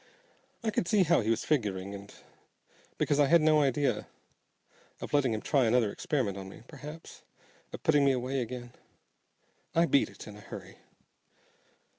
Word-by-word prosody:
I 220 Hz, -, 0 dB
could 185 Hz, -, -1 dB
see 205 Hz, -1 st, +4 dB
how 170 Hz, -4 st, +3 dB
he 110 Hz, -, -2 dB
was 115 Hz, -, 0 dB
figuring, 100 Hz, -9 st, -1 dB
and 100 Hz, 0 st, -9 dB, 0.9 s
because 145 Hz, -, +1 dB
I 145 Hz, -, +5 dB
had 170 Hz, +4 st, +6 dB
no 155 Hz, -1 st, +4 dB
idea 140 Hz, 0 st, +1 dB, 0.9 s
of -, -, -7 dB
letting 140 Hz, -4 st, +3 dB
him 110 Hz, -1 st, -3 dB
try 135 Hz, -4 st, +2 dB
another 115 Hz, -2 st, +3 dB
experiment 105 Hz, -9 st, -2 dB
on 95 Hz, 0 st, -8 dB
me, 105 Hz, -, -13 dB
p'r'aps 150 Hz, +2 st, -10 dB, 0.5 s
of -, -, -8 dB
putting 145 Hz, -2 st, +4 dB
me 140 Hz, -, +5 dB
away 130 Hz, +1 st, -1 dB
again, 120 Hz, 0 st, -6 dB, 1.0 s
I 165 Hz, +1 st, +5 dB
beat 140 Hz, -, +3 dB
it -, -, -12 dB
in 105 Hz, -, -10 dB
a 105 Hz, -, -12 dB
hurry. -, -, -10 dB
135 Hz, 165 wpm, -30 LUFS, 110-150 Hz, 1.0 s, had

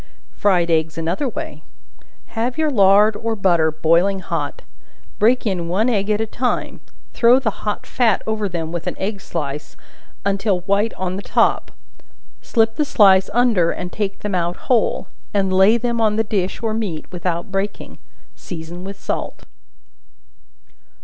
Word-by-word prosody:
Fried 180 Hz, -5 st, +1 dB
Eggs 160 Hz, 0 st, +1 dB
another 175 Hz, -, -1 dB
way. 310 Hz, +5 st, -7 dB, 0.7 s
Have 240 Hz, +4 st, -2 dB
your 310 Hz, -1 st, +1 dB
lard 205 Hz, -1 st, +5 dB
or 225 Hz, +1 st, -2 dB
butter 175 Hz, -6 st, +3 dB
boiling 170 Hz, +5 st, +2 dB
hot; 165 Hz, -6 st, -4 dB, 0.6 s
break 240 Hz, +4 st, +3 dB
in 180 Hz, -5 st, -1 dB
one 205 Hz, +8 st, +1 dB
egg 205 Hz, -3 st, 0 dB
at 210 Hz, 0 st, +2 dB
a 220 Hz, -, 0 dB
time; 245 Hz, +3 st, -2 dB, 0.3 s
throw 240 Hz, +2 st, +5 dB
the 250 Hz, -5 st, 0 dB, 0.2 s
hot 210 Hz, -, -2 dB
fat 230 Hz, -5 st, +1 dB
over 215 Hz, -2 st, -1 dB
them 165 Hz, -2 st, -4 dB
with 175 Hz, -1 st, -5 dB
an -, -, -3 dB
egg 200 Hz, +1 st, -3 dB
slice, 150 Hz, -5 st, -5 dB, 0.5 s
until 200 Hz, -1 st, +1 dB
white 200 Hz, +4 st, 0 dB
on 185 Hz, 0 st, -3 dB
the -, -, -5 dB
top; -, -, +1 dB, 0.7 s
slip 225 Hz, -1 st, +1 dB
the 300 Hz, -, +2 dB
slice 195 Hz, -8 st, +5 dB
under 225 Hz, -7 st, +3 dB
and 180 Hz, +1 st, -4 dB
take 200 Hz, -2 st, -3 dB
them 205 Hz, -1 st, -3 dB
out 175 Hz, -1 st, 0 dB
whole, 240 Hz, -4 st, 0 dB, 0.3 s
and 195 Hz, -2 st, +1 dB
lay 190 Hz, +5 st, +5 dB
them 235 Hz, 0 st, -1 dB
on 215 Hz, -1 st, +2 dB
the 225 Hz, -, +2 dB
dish 200 Hz, 0 st, -2 dB
or 220 Hz, -1 st, 0 dB
meat 205 Hz, -8 st, -3 dB
without 175 Hz, 0 st, -3 dB
breaking; 195 Hz, +1 st, -4 dB, 0.4 s
season 170 Hz, +1 st, -8 dB
with 195 Hz, +1 st, -8 dB
salt. -, -, -4 dB
200 Hz, 155 wpm, -20 LUFS, 175-225 Hz, 0.7 s, lard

